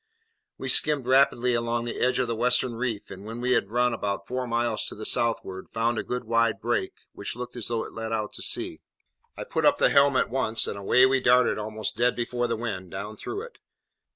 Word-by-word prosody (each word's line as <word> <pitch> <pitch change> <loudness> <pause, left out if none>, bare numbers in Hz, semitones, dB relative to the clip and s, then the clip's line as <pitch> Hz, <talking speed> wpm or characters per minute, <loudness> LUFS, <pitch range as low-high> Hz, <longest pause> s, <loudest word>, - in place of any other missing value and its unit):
We - - -5
skimmed 150 -4 +3
rapidly 125 -1 +3
along 115 0 -1
the 120 - -4
edge 125 - +2
of 130 - +1
the 115 - -2
western 125 +1 +2
reef, 115 -3 -3
and 95 +1 -9
when 115 +3 -7
we 125 +1 0
had 100 -5 +2
run 120 +1 +2
about 100 -3 -3
four 125 +2 -3
miles 120 -1 0
to - - -5
the 110 - -7
southward, 95 -5 -1
found 115 +1 0
a - - -2
good 125 0 -3
wide 115 -1 +1
break, 115 -5 -2
which 100 - -4
looked 125 +1 -7
as 120 -4 -4
though 115 -1 -1
it - - -10
led 110 0 -5
out 110 -2 -2
to - - -7
sea. 350 -2 -3 0.6
I - - -4
put - - -2
up 290 0 +5
the - - +4
helm 140 -1 +5
at 125 - +1
once, 115 -4 0
and - - -3
away 100 +6 +4
we 135 0 +3
darted 125 -2 +4
almost 110 0 -4
dead 120 0 +2
before 120 0 -1
the 115 - -1
wind, 100 -6 -4
down 100 +4 -6
through 395 - -5
it. 480 +1 -12
120 Hz, 230 wpm, -26 LUFS, 110-125 Hz, 0.6 s, up